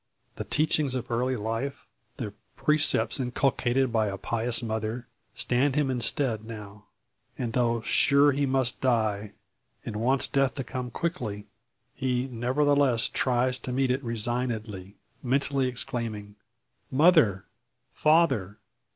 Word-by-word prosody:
The - - -4
teachings 150 -3 +1
of 125 -1 -4
early 125 +2 0
life, 115 +5 -4 0.3
the 110 -7 -5 0.2
precepts 150 -2 +2
inculcated 130 0 0
by 110 -2 +2
a 100 -1 -4
pious 115 +3 -1
mother, 110 +2 -3 0.3
stand 130 +3 +1
him 145 -3 +1
in 125 -2 -2
stead 115 -2 0
now. 105 -2 -10 0.5
And 120 -4 -3
though 120 -2 +1
sure 140 +4 +4
he 140 0 0
must 130 -2 0
die, 110 -5 0 0.5
and - - -5
wants 130 +5 +2
death 135 -1 +1
to 135 - -3
come 125 0 -5
quickly, 110 - -4 0.5
he 125 0 -1
nevertheless 130 0 +1
tries 125 0 0
to 125 - -6
meet 130 0 +1
it 130 +2 -1
resignedly, 110 -4 -3 0.3
mentally 135 +1 +1
exclaiming: 115 -4 -3 0.5
"Mother! 135 - +4 0.5
Father! 135 - +2
125 Hz, 125 wpm, -27 LUFS, 110-135 Hz, 0.5 s, sure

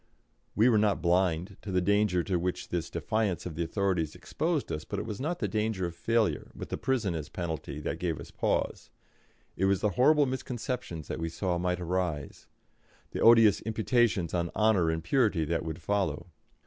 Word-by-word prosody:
We 110 +3 +5
were 115 -4 +5
not 105 -1 +2
blind 90 +2 +1
to 100 - -6
the 90 - +2
danger 100 -1 +2
to 90 -1 0
which 90 +1 -3
this 85 -2 -2
defiance 110 -5 -1
of 90 - -4
the 85 +2 -2
authorities 85 -3 -1
exposed 160 -3 -2
us, 75 - -3
but 100 - -5
it - - -3
was 110 +1 -5
not 165 +5 -1
the - - -1
danger 110 -4 -1
of 85 - -4
failure, 110 - 0
with - - -7
the - - -3
prison 120 -8 0
as 80 -3 -5
penalty, 80 -4 -4
that - - -3
gave 85 -4 -2
us - - -10
pause. - - -1 0.7
It 95 - +1
was 95 -1 +2
the 105 - +2
horrible 145 +5 +4
misconceptions 125 - -4
that - - -4
we 80 0 -2
saw 90 +1 -1
might 90 0 0
arise; 90 -4 -3 0.6
the - - -4
odious 115 -3 +7
imputations 110 -5 +1
on 85 -1 0
honour 105 -6 +3
and 80 0 -2
purity 100 - +2
that 85 +1 -1
would 80 0 -5
follow. 85 -3 -1
95 Hz, 190 wpm, -29 LUFS, 85-110 Hz, 0.7 s, odious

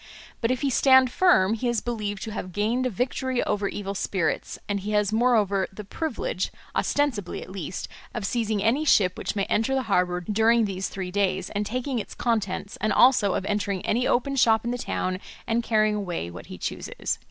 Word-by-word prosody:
But 230 - +1
if 255 -1 0
he 280 -2 +1
stand 260 0 +5
firm 235 - +4
he 230 +2 -2
is 240 -2 +1
believed 210 -4 -3
to 220 - -5
have 185 -4 -6
gained 230 +6 +1
a - - -1
victory 250 +3 -1
over 205 -1 0
evil 200 0 -4
spirits, 190 -3 -1
and 205 -1 -1
he 210 +2 -4
has 210 0 +2
moreover 215 -5 +2
the 210 +2 -8
privilege, 225 - -3 0.2
ostensibly 250 -11 0
at - - -12
least, 185 -2 -5 0.2
of 235 -5 -4
seizing 220 -3 0
any 245 +8 +2
ship 190 -11 +4
which - - -4
may 200 - +1
enter 225 +7 +1
the 265 - 0
harbour 180 -1 +2
during 220 +4 +3
these 190 -1 -3
three 185 -2 -5
days, 190 -1 0
and 205 0 -2
taking 255 +1 -2
its - - -7
contents, 210 -4 -1
and 215 - +1
also 240 -6 +5
of 190 - -2
entering 200 -2 -1
any 245 +3 +1
open 275 +3 +1
shop 225 -3 +4
in 240 - 0
the 245 - -3
town 185 -5 -2 0.3
and 230 +1 +1
carrying 215 -2 +2
away 175 - -3
what 90 - -10
he - - -8
chooses." - - -3
215 Hz, 200 wpm, -25 LUFS, 195-240 Hz, 0.3 s, stand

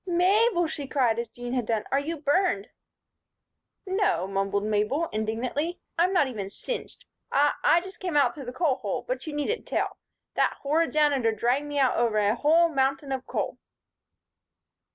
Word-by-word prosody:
"Mabel!" 365 +2 +3
she 295 -3 -5
cried, 245 -5 +1
as 235 -1 -4
Jean 245 +1 -6
had 245 -4 -1
done. 220 -2 0
"Are 275 - +3
you 320 +4 -3
burned?" 290 - +1 1.2
"No," 385 - +1
mumbled 195 +1 -1
Mabel, 215 +10 0
indignantly. 240 +10 -2 0.2
"I'm 350 +3 +3
not 350 -7 +3
even 205 -6 -5
singed. - - -6 0.3
I 290 +1 +3
I 340 - +5
just 380 +2 -10
came 355 -5 -1
out 270 -4 +4
through 280 -3 -9
the 245 - -5
coal 275 -1 +1
hole, - - -3
but - - -3
you 305 - -4
needn't 295 +11 -2
tell. - - -1 0.4
That - - +1
horrid 315 +4 +1
Janitor 285 -6 +3
dragged 245 +7 0
me 290 0 -4
out 265 -2 +3
over 230 -2 +1
a 205 0 +3
whole 320 +7 +4
mountain 275 -1 0
of 265 -1 -3
coal." - - -3
280 Hz, 175 wpm, -26 LUFS, 235-335 Hz, 1.2 s, I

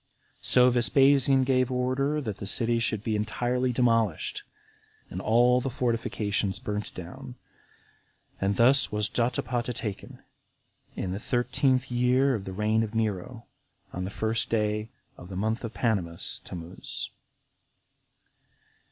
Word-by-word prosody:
So 125 0 +5
Vespasian 135 +2 +4
gave 130 -1 +2
order 130 +4 0
that 110 -7 -4
the 100 - -6
city 115 +2 +2
should 110 -2 -1
be 110 -2 -1
entirely 120 +4 0
demolished, 115 -7 +1 0.7
and 90 - -4
all 120 +4 +4
the 135 - -2
fortifications 115 -5 -1
burnt 105 0 -4
down. 125 +9 -9 1.0
And 100 +1 0
thus 130 +5 +4
was 105 -1 +1
Jotapata 120 0 -1
taken, 105 -4 -6 0.7
in 90 - -3
the 95 - -3
thirteenth 130 +2 +1
year 125 +3 +3
of 105 -5 -3
the 95 - -5
reign 105 +3 +1
of 110 0 -3
Nero, 110 +1 -2 0.5
on 90 - -3
the 95 - -3
first 110 +2 0
day 105 0 0 0.3
of 90 - -11
the 95 - -7
month 110 +4 -1
Panemus 95 -8 -1
[Tamuz]. 85 +1 -5
115 Hz, 125 wpm, -27 LUFS, 105-125 Hz, 1.0 s, So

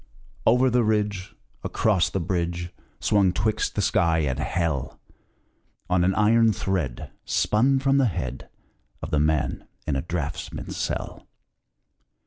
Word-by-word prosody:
Over 125 +3 +4
the 120 0 +3
ridge, 105 -3 -1 0.3
Across 105 -5 +1
the 95 - -2
bridge, 85 0 -2 0.3
Swung 100 -3 +3
twixt 105 +4 -1
the 105 - 0
sky 85 -3 +2
and 70 -2 -1
hell, 75 -5 -2 0.9
On 90 -1 +3
an 95 +2 +2
iron 115 +1 +4
thread 90 -11 -3
Spun 130 +6 +2
from 135 +1 +2
the 135 - +4
head 70 - -4 0.5
Of - - -5
the 75 - +2
man 75 -4 0 0.2
in 75 - -1
a 70 - 0
draughtsman's 80 -3 -5
cell. - - -4
90 Hz, 130 wpm, -25 LUFS, 80-110 Hz, 0.9 s, Over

